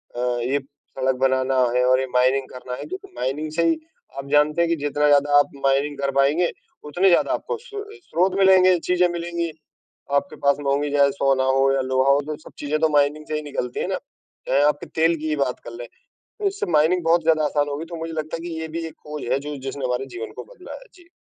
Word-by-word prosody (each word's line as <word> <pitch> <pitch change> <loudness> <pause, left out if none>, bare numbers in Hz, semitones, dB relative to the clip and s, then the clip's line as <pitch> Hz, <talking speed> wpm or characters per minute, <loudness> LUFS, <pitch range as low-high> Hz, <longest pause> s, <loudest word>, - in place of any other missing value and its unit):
अ, - - -5
ये 125 +2 0
सड़क 135 -1 -4
बनाना 130 0 +2 0.2
है 125 - +3
और 130 0 +4
ये 130 - -1
माइनिंग 130 +1 +3
करना 125 0 -8
है, - - -7
क्योंकि 380 +4 -7
माइनिंग 150 +4 -2
से 170 +2 0
ही 325 - +2 0.4
आप 140 - -6
जानते 150 +3 +3
हैं 170 - +2
कि 170 - +2
जितना 145 0 0
ज़्यादा 145 0 +4
आप - - +2 0.2
माइनिंग 140 +1 +1
कर 140 0 0
पाएँगे, 145 +6 +3 0.3
उतने 175 +6 +2
ज़्यादा 175 - +3
आपको 475 0 -3
सो 440 -2 -9
अ, 430 +1 -13
स्रोत 185 +3 0
मिलेंगे, 185 -1 +6
चीज़ें 180 0 +4
मिलेंगी, 170 -1 -3 0.7
आपके 190 - -13
पास 140 - +4
महँगी 140 +1 0
जैसे 140 -1 +4
सोना 135 -1 +3
हो 135 0 +4
या 135 - +1
लोहा 130 +1 +3
हो, 140 +1 +3
तो 150 +1 -5
सब - - -12
चीज़ें 150 +1 -1
तो 160 0 +3
माइनिंग 145 +2 +1
से 155 - -3
ही 150 - -2
निकलती 125 -2 -3
हैं - - -1
ना, - - -1 0.5
चाहे 140 - +3
आपके 145 0 +1 0.2
तेल 165 +1 +4
की 155 +1 -4
ही 155 - +1
बात 125 - -4
कर 115 - -8
लें। 120 0 -8 0.5
तो 415 - -3
इससे 395 +1 -2
माइनिंग 160 +3 +3
बहुत 165 +1 +3
ज़्यादा 155 -2 +3
आसान 145 0 0
होगी, 145 +3 -4
तो 170 0 -8
मुझे 165 0 -5
लगता 155 0 -4
है 170 +1 -7
कि 160 -1 -5
ये 160 - -4
भी 165 - -3
एक 160 - -10
खोज 150 -1 -6
है - - +2
जो 145 +1 -6
जिसने 135 0 -4
हमारे 125 +1 -1
जीवन 115 -1 -6
को - - -7
बदला 370 - -11
है। - - -15
जी। 350 -2 -19
150 Hz, 240 wpm, -22 LUFS, 135-170 Hz, 0.7 s, मिलेंगे